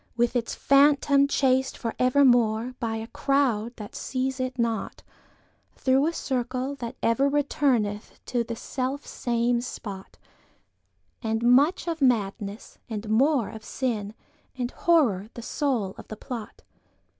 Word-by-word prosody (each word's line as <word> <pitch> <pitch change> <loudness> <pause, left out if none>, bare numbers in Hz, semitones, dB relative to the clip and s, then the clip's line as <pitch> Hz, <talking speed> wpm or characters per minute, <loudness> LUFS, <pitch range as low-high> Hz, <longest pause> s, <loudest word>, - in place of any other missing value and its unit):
With 240 +1 +1
its 235 -2 -1
Phantom 280 0 +4
chased 265 -1 +1
for 230 -2 -3
evermore, 245 -3 +3
By 225 -3 -2
a 220 0 -4
crowd 265 -4 0
that 210 -2 -9
seize 260 0 -2
it 255 0 -3
not, 230 -2 -2 0.7
Through 265 +3 +2
a - - +1
circle 255 -2 -2
that 235 -3 -6
ever 250 +5 +3
returneth 265 -7 0
inTo 235 -2 -1
the 230 - -4
self 260 +4 -4
same 240 -1 0
spot, 200 -5 -8 1.0
And 225 -1 -1
much 275 +10 +4
of 330 -2 -3
Madness, 210 -4 -1
and 215 -1 -4
more 260 +1 +3
of 220 -1 -10
Sin, 220 -5 -3 0.4
And 245 0 -2
Horror 235 - +2
the 235 - -7
soul 240 -9 -1
of - - -11
the 215 - -8
plot. 230 -2 -8
245 Hz, 135 wpm, -26 LUFS, 225-275 Hz, 1.0 s, Phantom